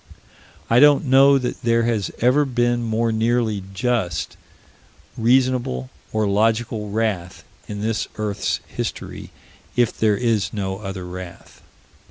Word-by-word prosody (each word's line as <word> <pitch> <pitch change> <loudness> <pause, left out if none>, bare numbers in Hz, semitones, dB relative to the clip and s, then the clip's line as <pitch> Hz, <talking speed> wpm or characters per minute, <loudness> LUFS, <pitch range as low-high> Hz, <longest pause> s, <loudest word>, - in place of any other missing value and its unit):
I 115 - +4
don't 145 +1 +6
know 135 +1 +6
that 125 -2 -3
there 115 0 +2
has 115 -4 0
ever 130 +5 +4
been 120 -2 0
more 115 0 0
nearly 110 -2 0
just, 95 -5 -1 0.8
reasonable, 120 - +1 0.2
or 110 -1 0
logical 110 +1 0
wrath, 100 -5 -2 0.2
in 105 -1 -5
this 110 0 -1
earth's 105 -2 -2
history - - -6 0.5
if 120 -2 +2
there 105 -2 +2
is 110 -5 0
no 95 -2 -3
other 95 -3 -6
wrath. 90 0 -10
110 Hz, 125 wpm, -21 LUFS, 100-120 Hz, 0.8 s, don't